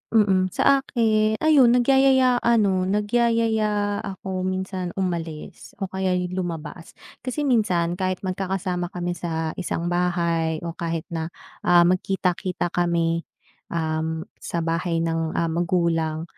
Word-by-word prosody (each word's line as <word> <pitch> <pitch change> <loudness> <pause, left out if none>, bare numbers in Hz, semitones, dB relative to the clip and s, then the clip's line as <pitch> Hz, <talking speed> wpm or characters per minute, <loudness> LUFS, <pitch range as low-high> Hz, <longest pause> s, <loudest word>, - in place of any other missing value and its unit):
mm, 190 -3 +4
sa 275 - +4
aki 220 -5 +1
ayun, 275 -6 +6
nagyayaya 260 0 +4
ano, 200 -6 +2
nagyayaya 215 -1 +1
ako 190 -2 -4
minsan 185 -1 -3
umalis 170 -5 -4
o 195 -2 -5
kaya 190 -1 0
'yong 180 +1 -2
lumabas. 165 -1 -6 0.2
Kasi 265 +4 -3
minsan, 180 -9 +1
kahit 185 0 -2
magkakasama 185 -1 -2
kami 175 0 -2
sa 160 -1 -2
isang 175 -1 -2
bahay 170 -2 0
o 170 - -3
kahit 165 -1 -3
na, 160 -1 -2 0.4
ah, 175 -1 +7
magkita-kita 180 0 0
kami, 170 -1 0 0.4
um, 160 0 -2 0.2
sa 170 -1 -3
bahay 165 0 -1
ng, 165 -1 -1
ah, 165 -1 0
magulang, 165 -2 0
180 Hz, 125 wpm, -23 LUFS, 170-205 Hz, 0.4 s, ah